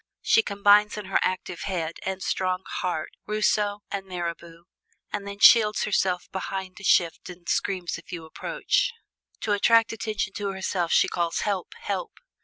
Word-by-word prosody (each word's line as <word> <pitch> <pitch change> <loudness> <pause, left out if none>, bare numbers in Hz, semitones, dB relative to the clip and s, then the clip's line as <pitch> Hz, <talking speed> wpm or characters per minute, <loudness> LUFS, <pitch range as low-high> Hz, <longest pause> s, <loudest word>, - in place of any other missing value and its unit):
She 225 - +5
combines 205 0 +4
in 210 - -5
her 190 - +1
active 185 -1 -2
head 170 -4 -3
and 190 -1 -3
strong 185 0 -1
heart 175 -4 -3 0.2
Rousseau 210 -1 +1
and 195 -1 -4
Mirabeau; 170 -2 -6 0.5
and 200 -1 -3
then 200 0 -6
shields 215 0 +6
herself 190 -3 0
behind 190 -1 -5
a - - -12
shift 170 -2 +2
and 175 -1 -12
screams 185 -4 -1
if 165 - -15
you 170 -3 -6
approach. - - -1 0.5
To 215 - -1
attract 225 +3 +4
attention 215 -3 -3
to 200 -1 -3
herself 185 -2 -2
she - - +5
calls, 170 -1 -1
'Help, 200 -4 -2
help!'" 485 - -4
190 Hz, 160 wpm, -26 LUFS, 180-210 Hz, 0.5 s, shields